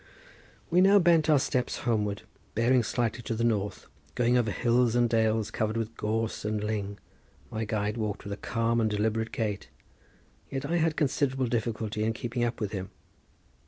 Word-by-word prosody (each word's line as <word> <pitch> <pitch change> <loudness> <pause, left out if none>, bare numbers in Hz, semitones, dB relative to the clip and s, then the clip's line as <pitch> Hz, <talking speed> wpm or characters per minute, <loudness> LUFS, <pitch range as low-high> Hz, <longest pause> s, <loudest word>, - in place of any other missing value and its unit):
We 180 +2 +5
now 195 +2 +7
bent 170 -4 +4
our 150 - +6
steps 130 -2 0
homeward, 105 -4 0 0.3
bearing 120 +3 +4
slightly 120 0 -1
to 115 0 -3
the 115 - -1
north, 105 -4 0 0.3
going 120 0 +3
over 120 -3 +2
hills 120 +3 +2
and 120 0 +4
dales 110 -2 +1
covered 110 +1 -1
with 115 0 -3
gorse 110 +1 -2
and 105 0 -1
ling. 100 -2 -3 0.5
My 110 0 -2
guide 105 +1 -1
walked 105 -3 -3
with 100 - -5
a - - -6
calm 115 +1 0
and 110 - +2
deliberate 110 +2 0
gait, 105 -3 -3 0.8
yet 135 0 -3
I 170 +4 0
had 160 -1 +1
considerable 135 -3 +1
difficulty 110 -2 -2
in 110 +1 +1
keeping 120 +1 -3
up 120 0 -1
with 105 -2 -2
him. 95 -2 -4
115 Hz, 175 wpm, -28 LUFS, 105-125 Hz, 0.8 s, now